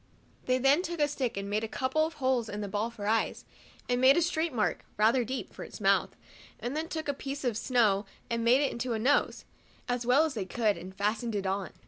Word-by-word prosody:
They 255 Hz, 0 st, +3 dB
then 275 Hz, +5 st, +4 dB
took 345 Hz, -2 st, -5 dB
a 295 Hz, -, +4 dB
stick 260 Hz, -6 st, -3 dB
and 200 Hz, 0 st, -3 dB
made 210 Hz, +2 st, -1 dB
a -, -, -1 dB
couple 290 Hz, +7 st, 0 dB
of 325 Hz, -, -11 dB
holes 255 Hz, -4 st, 0 dB
in 205 Hz, +1 st, -4 dB
the 205 Hz, -, -3 dB
ball 210 Hz, +3 st, -1 dB
for 225 Hz, -3 st, -8 dB
eyes, 225 Hz, +2 st, 0 dB, 0.4 s
and 245 Hz, 0 st, +1 dB
made 265 Hz, +3 st, +7 dB
a -, -, +4 dB
straight 330 Hz, -1 st, 0 dB
mark, 225 Hz, -5 st, -1 dB
rather 230 Hz, +4 st, +4 dB
deep, 260 Hz, +3 st, -5 dB
for -, -, -8 dB
his -, -, -10 dB
mouth, -, -, +2 dB, 0.4 s
and 245 Hz, +4 st, -4 dB
then 315 Hz, +1 st, -2 dB
took 315 Hz, -2 st, -4 dB
a 285 Hz, -, +1 dB
piece 275 Hz, +1 st, -6 dB
of 245 Hz, -4 st, 0 dB
snow 215 Hz, -4 st, +2 dB, 0.2 s
and 230 Hz, 0 st, -1 dB
made 245 Hz, +4 st, +5 dB
it 280 Hz, -, +1 dB
into 240 Hz, 0 st, -3 dB
a -, -, 0 dB
nose, 270 Hz, +6 st, +1 dB, 0.4 s
as 245 Hz, 0 st, -1 dB
well 255 Hz, +6 st, +4 dB
as 315 Hz, -, -3 dB
they 210 Hz, -6 st, -3 dB
could, 215 Hz, 0 st, +1 dB
and 190 Hz, +1 st, -9 dB
fastened 215 Hz, +3 st, -1 dB
it 200 Hz, -1 st, -2 dB
on. 190 Hz, 0 st, -1 dB
245 Hz, 240 wpm, -29 LUFS, 215-275 Hz, 0.4 s, made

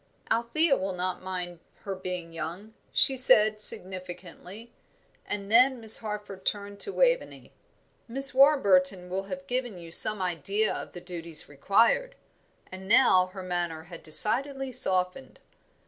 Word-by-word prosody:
"Althea 275 Hz, +7 st, +2 dB
will 190 Hz, -3 st, -4 dB
not 180 Hz, 0 st, -4 dB
mind 180 Hz, -2 st, -6 dB, 0.2 s
her 195 Hz, -, -5 dB
being 180 Hz, -3 st, -7 dB
young," 170 Hz, +7 st, -7 dB, 0.2 s
she 270 Hz, -, +3 dB
said, 215 Hz, -4 st, +5 dB
significantly; 185 Hz, +3 st, -3 dB, 0.5 s
and 200 Hz, 0 st, -5 dB
then 250 Hz, +2 st, +4 dB
Miss 220 Hz, -1 st, +2 dB
Harford 210 Hz, -3 st, -7 dB
turned 200 Hz, 0 st, -4 dB
to 400 Hz, -, -2 dB
Waveney. -, -, -1 dB, 0.5 s
"Miss 270 Hz, +3 st, 0 dB
Warburton 195 Hz, -10 st, +3 dB
will 190 Hz, +1 st, -3 dB
have 185 Hz, -1 st, -8 dB
given 245 Hz, -2 st, -4 dB
you 170 Hz, -1 st, -12 dB
some 215 Hz, +4 st, +6 dB
idea 195 Hz, +4 st, -2 dB
of -, -, -8 dB
the 175 Hz, -, -9 dB
duties 170 Hz, -3 st, -6 dB
required" 230 Hz, -, +1 dB, 0.6 s
and 190 Hz, +1 st, -10 dB
now 190 Hz, -5 st, +4 dB
her 185 Hz, +1 st, -10 dB
manner 175 Hz, -3 st, -4 dB
had 170 Hz, 0 st, -12 dB
decidedly 265 Hz, -, +2 dB
softened. 185 Hz, 0 st, -2 dB
195 Hz, 135 wpm, -27 LUFS, 180-235 Hz, 0.6 s, some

